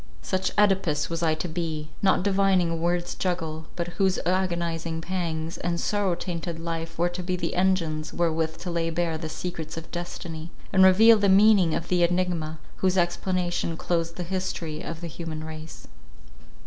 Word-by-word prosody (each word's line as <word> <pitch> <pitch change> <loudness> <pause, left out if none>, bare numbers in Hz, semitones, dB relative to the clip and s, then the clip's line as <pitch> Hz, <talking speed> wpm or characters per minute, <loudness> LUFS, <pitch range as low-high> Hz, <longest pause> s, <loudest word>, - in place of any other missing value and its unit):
Such 185 0 -1
Œdipus 190 -8 +2
was 165 0 -2
I 160 -2 +2
to 160 +3 -4
be—not 165 +2 -1
divining 190 -3 +3
a - - 0
word's 175 +1 0
juggle, 160 -4 -3
but 170 -1 -2
whose 190 -1 +3
agonizing 170 -3 0
pangs, 165 -2 -3
and 170 -1 -1
sorrow 200 -3 +1
tainted 170 -1 -4
life 165 0 -4
were 175 +1 +3
to 175 +1 -5
be 180 +1 -1
the 180 - -2
engines, 165 -5 +1
wherewith 160 -1 0
to 180 - -4
lay 165 -1 0
bare 165 -1 -1
the 160 -1 -5
secrets 160 -1 -5
of 165 - -8
destiny, 170 -2 -6 0.2
and 190 -1 +6
reveal 215 +4 +7
the 200 -1 +3
meaning 195 -3 +6
of 170 - -3
the 180 -1 +2
enigma, 170 -3 +1 0.2
whose 190 0 +1
explanation 175 -1 0
closed 165 -1 -1
the 180 - -3
history 175 -3 -3
of 165 0 -6
the 170 - -4
human 160 -1 -6
race. 155 0 -9
170 Hz, 170 wpm, -26 LUFS, 165-185 Hz, 0.2 s, reveal